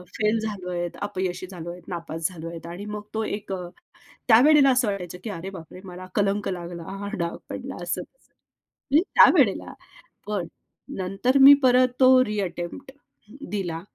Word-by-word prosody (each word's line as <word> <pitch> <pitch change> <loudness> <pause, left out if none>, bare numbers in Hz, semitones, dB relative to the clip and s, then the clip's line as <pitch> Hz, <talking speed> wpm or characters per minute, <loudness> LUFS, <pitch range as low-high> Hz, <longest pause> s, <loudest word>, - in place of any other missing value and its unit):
Fail 215 +1 +1
झालोयत, 180 -5 -4
अपयशी 185 -2 -3
झालोयत, 175 0 -8
नापास 165 -2 -3
झालोयेत 165 -1 -8
आणि 180 +4 -7
मग 210 0 -5
तो 220 0 -1
एक 205 -1 -5
अ, 180 -2 -5 0.6
त्यावेळेला 275 +4 +6
असं 250 -3 +2
वाटायचं 180 -3 -5
की 225 - -5
अरे 190 0 -6
बाप 165 -4 -11
रे! 185 - -10
मला 185 0 -9
कलंक 200 0 +1
लागला, 175 -2 -6 0.2
हा 200 - -4
डाग 170 0 -2
पडला - - -6
असं - - -2
तसं. - - -27 0.6
मी 305 +4 +6
त्यावेळेला - - +5 0.5
पण 200 -5 -2 0.5
नंतर 195 +8 0
मी 280 +1 +11
परत 255 0 +5
तो 260 0 +7
रिअटेम्प्ट 195 +4 -4 0.6
दिला 175 -5 -3
190 Hz, 150 wpm, -24 LUFS, 175-215 Hz, 0.6 s, मी